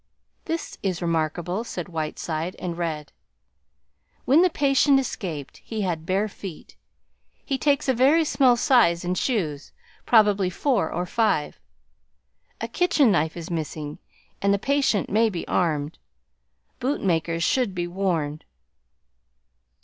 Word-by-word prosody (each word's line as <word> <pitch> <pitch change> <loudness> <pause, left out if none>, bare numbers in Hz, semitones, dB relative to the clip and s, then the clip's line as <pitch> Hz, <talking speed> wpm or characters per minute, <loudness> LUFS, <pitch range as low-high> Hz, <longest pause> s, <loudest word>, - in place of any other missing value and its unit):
"This 330 +1 -4
is 185 -3 -1
remarkable," 170 +4 -1
said 180 -7 -6
Whiteside, 160 0 -4
and 175 -2 -4
read 160 -3 -4 1.1
"When 285 +6 +5
the 365 - +5
patient 280 -2 +3
escaped, 170 - -5
he 220 -2 -5
had 170 -4 -2
bare 195 +3 +1
feet. 195 -5 -10 0.7
He 270 -1 -1
takes 285 -2 +1
a 260 - +3
very 280 +7 +4
small 255 -5 +4
size 180 -10 +3
in 180 - 0
shoes, 175 - -2 0.4
probably 205 -5 +4
four 205 - 0
or 175 - -2
five. 195 -6 0 1.0
A - - -3
kitchen 330 -9 +3
knife 160 -2 0
is 170 +1 -7
missing 155 -2 -4 0.4
and 200 - +2
the 200 - +3
patient 265 -2 +1
may 220 +2 +3
be 175 -5 -5
armed. 155 -3 -1 0.8
Boot 265 +3 -1
makers 165 -2 0
should 235 -1 +1
be 175 -1 -1
warned...." 175 -5 -2
185 Hz, 130 wpm, -24 LUFS, 165-245 Hz, 1.1 s, When